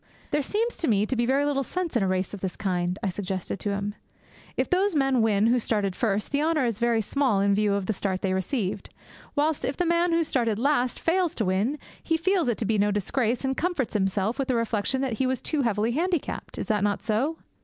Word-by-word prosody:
'There 295 - +2
seems 440 - -1
to 330 - -1
me 210 -2 +3
to 260 - -2
be 235 0 +1
very 275 +2 +2
little 285 -1 +1
sense 340 +4 -3
in 235 - +3
a 195 - +2
race 185 +1 -1
of 205 - -5
this 190 -2 -3
kind,' 180 -2 -1
I 195 - +1
suggested 190 0 -4
to 205 - -2
him. 200 +1 -2 0.6
'If - - +1
those 380 0 +2
men 270 -4 +3
win 215 -2 +3
who 240 +2 +4
started 205 -4 0
first, 210 -3 -1
the 285 +1 +1
honour 310 -3 +2
is 230 -3 -1
very 235 -1 +2
small 250 -1 +1
in 200 0 +3
view 205 0 +2
of 200 -2 -1
the 220 - 0
start 190 -1 -2
they 190 -1 +1
received; 190 +1 -2 0.5
whilst 300 +1 +1
if 265 - -2
the 355 - +1
man 340 +1 +2
who 335 0 +3
started 235 -8 0
last 255 -1 +1
fails 350 0 +1
to 220 - -1
win, 200 +10 +1 0.2
he 325 - +1
feels 360 -1 +1
it 235 - 0
to 225 - -2
be 215 0 +1
no 205 +1 +3
disgrace, 225 +5 0
and 265 0 0
comforts 340 -8 -1
himself 200 +4 0
with 270 - 0
the 255 - +1
reflection 230 +2 0
that 255 -5 -2
he 260 - +2
was 260 0 0
too 305 -3 -1
heavily 225 -2 +1
handicapped. 340 +4 -2
Is - - -3
that 210 -3 +1
not 205 -1 0
so?' 240 +9 0
235 Hz, 240 wpm, -26 LUFS, 205-290 Hz, 0.6 s, who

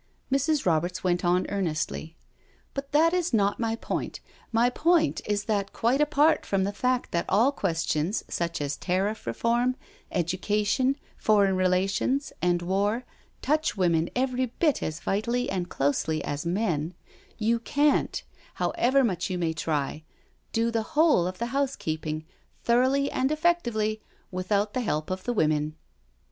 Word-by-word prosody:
Mrs. 280 +2 +1
Roberts 175 +2 0
went 180 0 +1
on 180 +1 +2
earnestly: 165 -4 -2 0.3
" - - -36
But 275 0 -5
that 320 +3 +4
is 355 -7 +1
not 200 -1 +2
my 225 -1 0
point - - -4 0.2
— - - -29
my 240 - +5
point 330 +3 +2
is 205 0 0
that 200 -3 -1
quite 250 +5 +2
apart 300 +1 +3
from 195 -1 0
the 200 +1 -1
fact 250 +3 0
that 170 - -1
all 225 +8 +4
questions 165 - -1
such 170 -2 -2
as 145 0 -2
tariff 195 +4 -1
reform, 240 +2 +1 0.4
education, 205 - +1 0.2
foreign 200 -3 +3
relations, 190 +9 +1
and 175 0 +1
war, 205 +7 0 0.4
touch 305 -4 +1
women 170 -3 +2
every 255 0 0
bit 295 +5 0
as 155 0 -3
vitally 235 +5 -1
and 180 -2 -2
closely 150 +3 0
as 145 +3 -3
men, 175 -4 -1 0.4
you 230 +1 +1
canH, 290 +5 +1 0.3
however 265 +3 +2
much 185 -5 -1
you 185 - -2
may 165 -2 0
try, 150 -2 -2 0.5
do 230 +1 +1
the 230 -1 0 0.2
whole 300 - +5
of 185 0 -5
the 235 +2 -4
housekeeping 160 - -2 0.4
thoroughly 260 +4 +3
and 265 +2 0
effectively 240 -10 +1 0.3
without 200 +3 0
the 255 - 0
help 155 -8 -2
of 185 0 -4
the 245 - 0
women." 155 -5 +1
205 Hz, 150 wpm, -27 LUFS, 175-255 Hz, 0.5 s, my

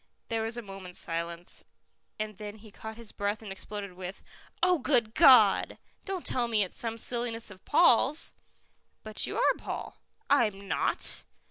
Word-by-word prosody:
There 225 -1 0
was 225 +2 -2
a 240 - -5
moment's 195 -3 -7
silence, 170 +1 -4 0.6
and 215 -2 -4
then 210 0 -6
he 215 0 -14
caught 220 +2 -8
his 230 -2 -8
breath 205 +2 -2
and 205 - -7
exploded 200 0 -6
with, 185 +1 -8 0.4
"Oh, 360 -2 +4
good 240 -5 +3
God! 255 - +6 0.3
Don't 385 -3 -4
tell 245 -2 +1
me 220 -3 +2
it's 185 - -7
some 230 -1 -3
silliness 235 -1 -3
of 190 -1 -14
Paul's." 295 -1 +4 0.7
"But 215 -1 0
you - - -4
are - - +4
Paul." - - -6 0.3
"I'm 210 -8 +2
not." - - 0
220 Hz, 160 wpm, -29 LUFS, 195-240 Hz, 0.7 s, God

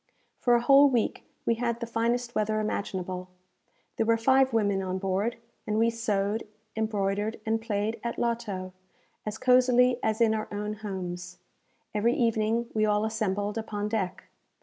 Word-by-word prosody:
For 240 -1 +4
a 235 - +3
whole 275 +3 +7
week 240 -4 0 0.2
we 230 - +3
had 235 -1 0
the 235 - -3
finest 235 +1 -1
weather 215 0 0
imaginable. 185 -3 -3 0.7
There 225 - +2
were 230 0 +4
five 265 +3 +4
women 205 -4 +1
on 185 0 -2
board; 195 +5 -1 0.3
and 215 0 0
we 230 +1 +3
sewed, 215 -1 -1 0.3
embroidered, 210 -1 -1
and 225 0 0
played 220 0 -2
at 235 - -3
loto, 205 -6 -2 0.5
as 215 0 -3
cosily 250 0 +4
as 220 +1 0
in 225 -2 +4
our 215 0 -2
own 210 +1 -3
homes. 180 -4 -5 0.6
Every 225 +3 +2
evening 230 0 +1
we 215 - +1
all 210 0 +2
assembled 210 -1 -1
upon 210 -1 -3
deck. 195 -4 -2
220 Hz, 155 wpm, -28 LUFS, 205-235 Hz, 0.7 s, whole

